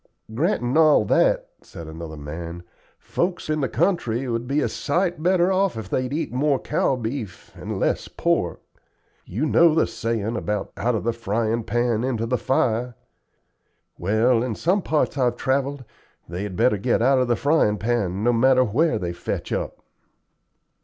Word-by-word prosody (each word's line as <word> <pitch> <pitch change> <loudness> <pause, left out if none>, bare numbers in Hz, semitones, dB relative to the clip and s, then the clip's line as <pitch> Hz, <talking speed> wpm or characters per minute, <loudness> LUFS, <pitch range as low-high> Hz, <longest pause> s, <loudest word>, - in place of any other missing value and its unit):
"Grantin' 130 - 0
all 155 -8 +5
that," - - +2
said 85 - -10
another 80 0 -8
man, 85 +4 -7 0.3
"folks 175 -3 -2
in 155 -1 0
the 135 - 0
country 130 - 0
would 120 0 -2
be 140 +3 +1
a - - +1
sight 175 +2 -1
better 180 +1 +3
off 190 -7 +1
if 105 -4 -7
they'd 130 0 -1
eat 150 -3 -3
more 140 +2 +2
cow 130 - 0
beef 115 -5 -6
and - - -5
less - - 0
pork. - - -1 0.6
You 120 - -2
know 165 +1 +4
the 160 - +4
sayin' 115 -1 -2
about 105 -3 -3
'out 120 +2 0
of 110 - -2
the 115 +1 0
frying 115 0 -1
pan 120 0 0
into 120 -3 -1
the 125 +2 -1
fire'? 120 -1 0 1.0
Well, 110 +6 +2
in 120 -3 -2
some 185 - +1
parts 150 -4 0
I've 120 -2 +2
travelled 140 0 -1 0.4
they 85 +3 -5
had 100 -2 -5
better 115 0 +2
get 120 +1 +1
out 135 +1 +4
of 125 - +1
the 120 - +2
fryin' 140 -7 +2
pan, 105 -4 -1
no 120 +1 +3
matter 130 +2 +4
where 125 +4 +1
they 90 -4 -3
fetch - - -4
up." - - -4
120 Hz, 170 wpm, -23 LUFS, 110-140 Hz, 1.0 s, all